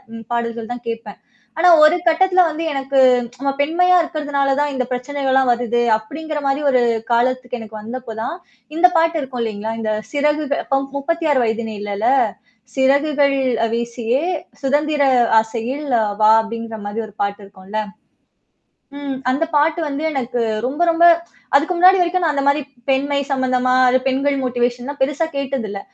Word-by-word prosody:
ம் 225 Hz, 0 st, -9 dB
பாடல்கள் 235 Hz, 0 st, -3 dB
தான் 240 Hz, -1 st, -10 dB
கேட்பேன். 225 Hz, -3 st, -7 dB, 0.4 s
ஆனா, 355 Hz, +2 st, +5 dB
ஒரு 310 Hz, +3 st, +6 dB
கட்டத்துல 365 Hz, +2 st, +4 dB
வந்து 320 Hz, +1 st, -4 dB
எனக்கு 270 Hz, -1 st, -1 dB, 0.4 s
நம்ம 275 Hz, -, -1 dB
பெண்மையா 360 Hz, +5 st, +3 dB
இருக்கிறதுனால 290 Hz, -4 st, -1 dB
தான் 290 Hz, 0 st, 0 dB
இந்த 255 Hz, -1 st, -1 dB
பிரச்சனைகள்லாம் 265 Hz, 0 st, 0 dB
வருது. 240 Hz, 0 st, 0 dB, 0.2 s
அப்படிங்கிற 300 Hz, +7 st, -6 dB
மாரி 275 Hz, +1 st, 0 dB
ஒரு 255 Hz, -1 st, +3 dB, 0.3 s
காலத்துக்கு 245 Hz, +1 st, 0 dB
எனக்கு 220 Hz, -1 st, -9 dB
வந்தப்போ 235 Hz, +1 st, -7 dB
தான், 230 Hz, -, -3 dB, 0.4 s
இந்த 360 Hz, +2 st, +5 dB
பாட்டு 330 Hz, 0 st, +2 dB
இருக்கும் 260 Hz, -3 st, -5 dB
இல்லைங்களா? 220 Hz, 0 st, -4 dB
இந்த 215 Hz, -1 st, -1 dB, 0.2 s
சிறகுக 295 Hz, 0 st, 0 dB
பம் 275 Hz, 0 st, 0 dB
36 300 Hz, -2 st, 0 dB
வயதினிலேல, 215 Hz, -2 st, -3 dB, 0.7 s
"சிறகுகள் 280 Hz, +1 st, +2 dB, 0.3 s
அ -, -, 0 dB
வீசியே 235 Hz, +3 st, -2 dB, 0.4 s
சுதந்திர 295 Hz, +2 st, +1 dB, 0.4 s
ஆசையில் 235 Hz, +6 st, -5 dB, 0.2 s
அ -, -, 0 dB, 0.2 s
வா" 215 Hz, +1 st, +7 dB
அப்படிங்கிற 230 Hz, 0 st, -6 dB
மாரி 210 Hz, +3 st, -3 dB
ஒரு -, -, -19 dB
பாட்டு 200 Hz, 0 st, -4 dB
இருக்கும்ல்ல. 195 Hz, +2 st, -6 dB, 1.2 s
ம். 280 Hz, -2 st, -4 dB
அந்த 270 Hz, +6 st, +1 dB
பாட்டு 305 Hz, +3 st, +2 dB
வந்து 290 Hz, 0 st, -4 dB
எனக்கு 255 Hz, -4 st, -2 dB, 0.2 s
ரொம்ப 285 Hz, +7 st, -3 dB
ரொம்ப 335 Hz, +1 st, +4 dB, 0.5 s
அதுக்கு 310 Hz, +6 st, +3 dB
முன்னாடி 365 Hz, +2 st, +5 dB
வரைக்கும் 355 Hz, +1 st, +1 dB
நான் 315 Hz, -3 st, +1 dB
அந்த 280 Hz, -1 st, -1 dB
மாரி 285 Hz, +1 st, +2 dB, 0.3 s
பெண்மை 280 Hz, +1 st, +1 dB
சம்மந்தமா, 255 Hz, -2 st, +1 dB
அது 250 Hz, +1 st, +4 dB
பெண்கள் 275 Hz, +1 st, 0 dB
மோட்டிவேஷன்லாம் 245 Hz, +2 st, -2 dB
பெருசா 290 Hz, +4 st, +1 dB
கேட்டது 270 Hz, -4 st, -3 dB
இல்ல. 200 Hz, 0 st, -5 dB
270 Hz, 150 wpm, -19 LUFS, 235-295 Hz, 1.2 s, வா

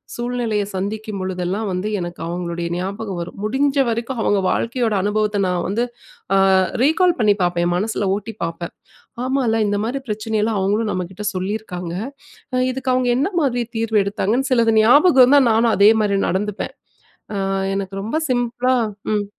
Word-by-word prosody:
சூழ்நிலைய 240 Hz, -3 st, -1 dB
சந்திக்கும் 210 Hz, +2 st, -4 dB
பொழுதெல்லாம், 185 Hz, +3 st, -2 dB
வந்து 185 Hz, +3 st, -2 dB
எனக்கு 175 Hz, 0 st, -6 dB
அவுங்களுடைய 170 Hz, -1 st, -3 dB
ஞாபகம் 195 Hz, +1 st, -4 dB
வரும். 170 Hz, -, -7 dB
முடிஞ்சவரைக்கும் 265 Hz, -1 st, 0 dB
அவுங்க 205 Hz, -2 st, +2 dB
வாழ்க்கையோட 235 Hz, -2 st, 0 dB
அனுபவத்த 210 Hz, 0 st, 0 dB
நான் 180 Hz, -1 st, -1 dB
வந்து 220 Hz, +5 st, 0 dB, 0.5 s
அ -, -, +5 dB, 0.5 s
ரீகால் 345 Hz, +4 st, +3 dB
பண்ணி 210 Hz, -3 st, +4 dB
பாப்பேன். 175 Hz, -1 st, +1 dB
என் 175 Hz, -, 0 dB
மனசுல 205 Hz, 0 st, -1 dB
ஓட்டி 220 Hz, +2 st, -6 dB
பாப்பேன். 170 Hz, +1 st, -5 dB, 0.5 s
ஆமால, 260 Hz, -3 st, +1 dB
இந்தமாரி 220 Hz, +7 st, -1 dB
பிரச்சனையெல்லாம் 215 Hz, 0 st, -1 dB
அவுங்களும் 210 Hz, +3 st, 0 dB
நம்மக்கிட்ட 185 Hz, +3 st, -5 dB
சொல்லியிருக்காங்க. 185 Hz, -3 st, -4 dB, 0.6 s
அ -, -, +2 dB
இதுக்கு 260 Hz, 0 st, -2 dB
அவுங்க 255 Hz, -1 st, +1 dB
என்னமாரி 280 Hz, -6 st, 0 dB
தீர்வ 225 Hz, -1 st, 0 dB
எடுத்தாங்கன்னு 215 Hz, +6 st, -1 dB
சிலது 230 Hz, -2 st, +3 dB
ஞாபகம் 270 Hz, +4 st, +6 dB
இருந்தா! 285 Hz, +3 st, +6 dB
நானும் 225 Hz, +1 st, +3 dB
அதேமாரி 210 Hz, 0 st, +4 dB
நடந்துப்பேன். 205 Hz, +3 st, -3 dB, 0.6 s
அ -, -, -2 dB, 0.4 s
எனக்கு 195 Hz, 0 st, -4 dB
ரொம்ப 225 Hz, +8 st, -3 dB
சிம்பிளா 245 Hz, +1 st, +1 dB, 0.4 s
ம். 205 Hz, -1 st, 0 dB
215 Hz, 140 wpm, -20 LUFS, 195-245 Hz, 0.6 s, ஞாபகம்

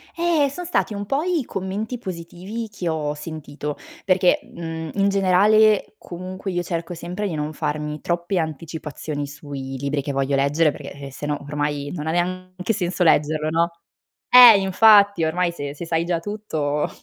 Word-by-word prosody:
Eh, 335 Hz, -4 st, +2 dB
son 350 Hz, +6 st, -7 dB
stati 335 Hz, -9 st, 0 dB
un 205 Hz, 0 st, -4 dB
po' 275 Hz, +8 st, 0 dB
i 345 Hz, -7 st, 0 dB
commenti 200 Hz, +6 st, -4 dB
positivi 185 Hz, +3 st, -6 dB
che 180 Hz, -4 st, -4 dB
ho 150 Hz, -2 st, -1 dB
sentito, 150 Hz, -1 st, -6 dB, 0.3 s
perché, 185 Hz, +7 st, +3 dB
mhmm, 165 Hz, -, -6 dB
in 200 Hz, 0 st, +2 dB
generale 205 Hz, +3 st, +4 dB
comunque 185 Hz, +2 st, -7 dB
io 175 Hz, -1 st, -1 dB
cerco 170 Hz, +1 st, -4 dB
sempre 180 Hz, +5 st, -4 dB
di 170 Hz, -, -3 dB
non 150 Hz, +1 st, -3 dB
farmi 150 Hz, 0 st, -3 dB
troppe 175 Hz, +2 st, -1 dB
anticipazioni 155 Hz, -2 st, -4 dB
sui 140 Hz, -2 st, -7 dB
libri 140 Hz, +1 st, -1 dB
che 140 Hz, -, -4 dB
voglio 135 Hz, 0 st, 0 dB
leggere, 145 Hz, +3 st, +3 dB
perché 140 Hz, -1 st, -9 dB
se 140 Hz, -, -7 dB
no 150 Hz, -1 st, -1 dB
ormai, 145 Hz, -1 st, -2 dB
non 155 Hz, -2 st, -5 dB
ha -, -, +1 dB
neanche 185 Hz, +3 st, -2 dB
senso 180 Hz, -2 st, -1 dB
leggerlo, 155 Hz, -1 st, +2 dB
no. 165 Hz, +2 st, +1 dB, 0.6 s
Eh, 245 Hz, -4 st, +10 dB
infatti, 200 Hz, -1 st, +5 dB
ormai 170 Hz, +2 st, 0 dB
se 145 Hz, -4 st, -6 dB
se 170 Hz, -, -6 dB
sai 165 Hz, 0 st, 0 dB
già 170 Hz, -1 st, 0 dB
tutto, 160 Hz, -7 st, -2 dB
170 Hz, 165 wpm, -22 LUFS, 150-195 Hz, 0.6 s, Eh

